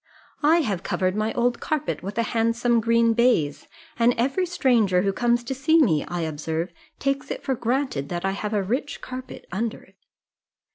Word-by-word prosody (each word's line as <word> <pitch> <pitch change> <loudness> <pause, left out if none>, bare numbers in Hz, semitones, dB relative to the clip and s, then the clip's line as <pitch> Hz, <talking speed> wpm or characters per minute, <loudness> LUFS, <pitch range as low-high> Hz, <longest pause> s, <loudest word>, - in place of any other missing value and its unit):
"I 320 +3 +5
have 200 - -2
covered 185 0 -1
my 215 +1 0
old 240 0 +1
carpet 305 -1 -2
with 195 +4 -6
a 230 - +2
handsome 230 +1 +2
green 230 0 +3
baize, 165 - +2 0.3
and 235 +1 +4
every 275 +10 +1
stranger 235 - +2
who 195 -1 +1
comes 240 +2 +1
to 245 - -3
see 295 +5 +3
me, 165 - +3
I 175 0 -3
observe, 160 +2 -3 0.2
takes 275 +1 -1
it - - -5
for 270 - 0
granted 240 - -1
that 175 +1 -3
I 195 - +1
have 210 +2 -3
a 200 - +1
rich 260 +8 -2
carpet 255 0 -8
under 220 +4 -3
it. - - -24
230 Hz, 185 wpm, -24 LUFS, 195-255 Hz, 0.3 s, I